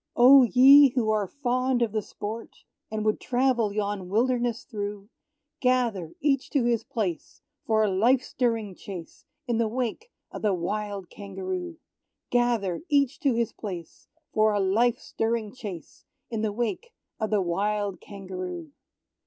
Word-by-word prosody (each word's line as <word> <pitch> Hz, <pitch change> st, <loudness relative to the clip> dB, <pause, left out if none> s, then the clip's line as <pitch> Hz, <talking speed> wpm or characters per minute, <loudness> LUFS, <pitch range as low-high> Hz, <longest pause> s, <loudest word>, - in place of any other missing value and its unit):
Oh, 265 Hz, +3 st, +8 dB
ye 270 Hz, +2 st, +7 dB
who 225 Hz, -4 st, +2 dB
are 210 Hz, -2 st, +1 dB
fond 255 Hz, 0 st, 0 dB
of 225 Hz, -, -1 dB
the 215 Hz, 0 st, -1 dB
sport, 215 Hz, +3 st, -8 dB, 0.3 s
And 215 Hz, 0 st, -3 dB
would 215 Hz, -, +1 dB
travel 245 Hz, -4 st, +1 dB
yon 200 Hz, -3 st, -3 dB
wilderness 240 Hz, +2 st, +1 dB
through, 205 Hz, -1 st, -6 dB, 0.5 s
Gather 235 Hz, -10 st, 0 dB
each 275 Hz, -2 st, +1 dB
to 280 Hz, -4 st, +3 dB
his 235 Hz, -1 st, +1 dB
place 215 Hz, -, -4 dB, 0.2 s
for 220 Hz, -1 st, +3 dB
a -, -, +3 dB
life 240 Hz, +7 st, +3 dB
stirring 230 Hz, -7 st, -1 dB
chase, 180 Hz, -2 st, -10 dB, 0.2 s
In 235 Hz, -2 st, 0 dB
the 230 Hz, -, +2 dB
wake 255 Hz, -, -3 dB, 0.2 s
of -, -, -7 dB
the 205 Hz, -3 st, +2 dB
wild 200 Hz, +2 st, -4 dB
Kangaroo! 350 Hz, -, -5 dB, 0.5 s
Gather 235 Hz, -7 st, +1 dB
each 280 Hz, -1 st, +2 dB
to 275 Hz, -8 st, +1 dB
his 235 Hz, -1 st, 0 dB
place 180 Hz, -6 st, -8 dB, 0.3 s
For 215 Hz, -1 st, +3 dB
a 205 Hz, -, +1 dB
life 220 Hz, +5 st, +2 dB
stirring 225 Hz, -2 st, -2 dB
chase 205 Hz, -10 st, -9 dB, 0.3 s
In 225 Hz, -2 st, -2 dB
the 220 Hz, -1 st, 0 dB
wake 240 Hz, -, -3 dB, 0.2 s
of 220 Hz, -1 st, -1 dB
the 210 Hz, -, +2 dB
wild 200 Hz, +1 st, -1 dB
Kangaroo! 195 Hz, -, -7 dB
220 Hz, 150 wpm, -26 LUFS, 205-250 Hz, 0.5 s, Oh